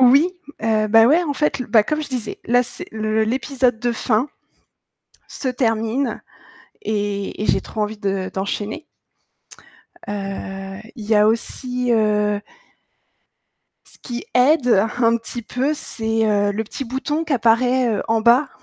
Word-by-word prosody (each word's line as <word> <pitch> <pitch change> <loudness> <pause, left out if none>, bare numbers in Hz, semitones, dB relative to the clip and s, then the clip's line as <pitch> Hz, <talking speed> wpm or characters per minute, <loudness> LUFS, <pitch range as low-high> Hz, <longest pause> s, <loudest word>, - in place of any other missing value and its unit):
Oui! 265 +5 +6 0.4
Heu, 215 -1 +1
bah 225 +1 +6
ouais, 320 +7 +4
en 305 -4 -2
fait 300 -1 0
l 250 - -4
bah, 220 0 +5
comme 305 +8 -2
je - - -6
disais, 245 -5 -4
là 245 +1 +3
c'est 245 - -5
le 220 0 0
l'épisode 250 0 0
de 240 -1 0
fin 235 +4 0 1.0
se 270 - -5
termine 235 +1 0 0.6
et 205 - -2
et - - -1
j'ai - - +3
trop 220 - -7
envie 210 +1 -1
de 195 -2 -2
d'enchaîner. 205 +9 -3 1.2
Heu, 195 -1 -5 0.2
il 220 - -7
y 225 - +2
a 210 0 +5
aussi, 245 +2 -1
heu 210 -2 +2 1.5
ce - - -13
qui 240 -2 -6
aide 250 -5 +4
un 230 -1 +4
petit 235 +1 -6
peu, 260 +7 -1
c'est, 225 -5 0
heu, 205 -1 +2
le 220 +2 -2
petit 270 - -6
bouton 270 +5 -2
qui 315 - -3
apparaît, 245 +2 +3
heu, - - -2
en 225 0 +2
bas. 240 +5 +5
225 Hz, 155 wpm, -21 LUFS, 215-255 Hz, 1.5 s, Oui